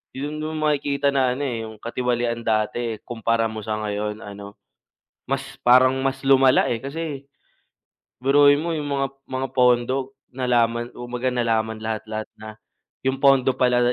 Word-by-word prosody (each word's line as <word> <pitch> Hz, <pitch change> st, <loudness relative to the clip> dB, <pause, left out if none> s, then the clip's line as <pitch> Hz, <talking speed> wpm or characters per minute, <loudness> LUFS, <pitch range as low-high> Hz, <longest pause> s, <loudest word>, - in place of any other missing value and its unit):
Yung 150 Hz, +3 st, -4 dB
do'n 155 Hz, 0 st, -4 dB
mo 155 Hz, -, +1 dB
makikita 140 Hz, -1 st, 0 dB
na 130 Hz, -2 st, +2 dB
ano, 145 Hz, -, -4 dB
eh, 115 Hz, -3 st, -3 dB
yung 110 Hz, -, -10 dB
katiwalian 120 Hz, 0 st, -2 dB
dati, 110 Hz, +1 st, -1 dB
kumpara 115 Hz, -1 st, 0 dB
mo 110 Hz, -1 st, -7 dB
sa 110 Hz, 0 st, -3 dB
ngayon 105 Hz, 0 st, -3 dB
ano, 100 Hz, -1 st, -10 dB, 0.7 s
mas 135 Hz, 0 st, 0 dB, 0.2 s
parang 130 Hz, +2 st, +6 dB
mas 135 Hz, 0 st, -1 dB
lumala, 135 Hz, -1 st, +5 dB
eh, 115 Hz, -, 0 dB
kasi, 140 Hz, 0 st, -5 dB, 1.0 s
biruin 145 Hz, +2 st, +5 dB
mo 170 Hz, +1 st, -2 dB
yung 150 Hz, -, -3 dB
mga 135 Hz, -1 st, 0 dB, 0.2 s
mga 130 Hz, 0 st, -3 dB
pondo, 125 Hz, +2 st, +2 dB, 0.2 s
nalaman 120 Hz, -2 st, +1 dB
kumbaga, 120 Hz, +1 st, -4 dB
nalaman 110 Hz, -2 st, 0 dB
lahat-lahat 110 Hz, 0 st, -4 dB
na. 110 Hz, 0 st, -11 dB, 0.4 s
Yung 130 Hz, 0 st, +1 dB
pondo 135 Hz, -2 st, +4 dB
pala 125 Hz, -1 st, +3 dB
125 Hz, 150 wpm, -23 LUFS, 115-135 Hz, 1.0 s, parang